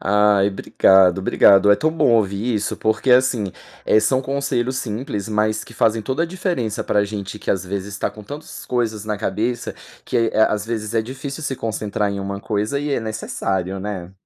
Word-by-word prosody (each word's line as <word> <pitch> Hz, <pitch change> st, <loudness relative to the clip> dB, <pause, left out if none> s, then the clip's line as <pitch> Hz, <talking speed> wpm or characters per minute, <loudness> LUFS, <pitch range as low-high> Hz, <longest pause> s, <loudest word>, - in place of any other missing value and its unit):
Ai, 105 Hz, 0 st, +3 dB
obrigado, 95 Hz, -1 st, +4 dB
obrigado, 100 Hz, +1 st, +5 dB
é 100 Hz, -, +6 dB
tão 155 Hz, -, +1 dB
bom 160 Hz, -7 st, +2 dB
ouvir 105 Hz, +2 st, +1 dB
isso, 105 Hz, 0 st, -1 dB
porque 110 Hz, +4 st, 0 dB
assim, 125 Hz, -6 st, +3 dB, 0.3 s
eh, 110 Hz, -, +5 dB
são 130 Hz, +5 st, +1 dB
conselhos 130 Hz, -2 st, -1 dB
simples 110 Hz, -2 st, -4 dB
mas 110 Hz, 0 st, 0 dB
que 115 Hz, -, -14 dB
fazem 110 Hz, 0 st, +2 dB
toda 130 Hz, +8 st, -1 dB
a -, -, 0 dB
diferença 170 Hz, -, -2 dB
para 105 Hz, 0 st, +2 dB
gente 100 Hz, 0 st, -6 dB
que -, -, -3 dB
às 95 Hz, -1 st, 0 dB
vezes 100 Hz, +1 st, -4 dB
está -, -, -2 dB
com 105 Hz, -, -12 dB
tantas 145 Hz, +8 st, -9 dB
coisas 110 Hz, -4 st, -1 dB
na 105 Hz, -1 st, -2 dB
cabeça, 110 Hz, +4 st, -2 dB, 0.3 s
que -, -, -2 dB, 0.2 s
é 110 Hz, -, +3 dB
às 105 Hz, -1 st, -1 dB
vezes 110 Hz, -1 st, -3 dB
é 110 Hz, -, +2 dB
difícil 135 Hz, +5 st, -7 dB
se 135 Hz, -3 st, -3 dB
concentrar 105 Hz, -2 st, -2 dB
em 100 Hz, 0 st, -4 dB
uma 100 Hz, 0 st, -4 dB
coisa 105 Hz, +7 st, -1 dB
e 145 Hz, 0 st, -3 dB
é -, -, 0 dB
necessário, 95 Hz, -4 st, -3 dB
né. 95 Hz, -3 st, -5 dB
110 Hz, 195 wpm, -21 LUFS, 100-125 Hz, 0.3 s, é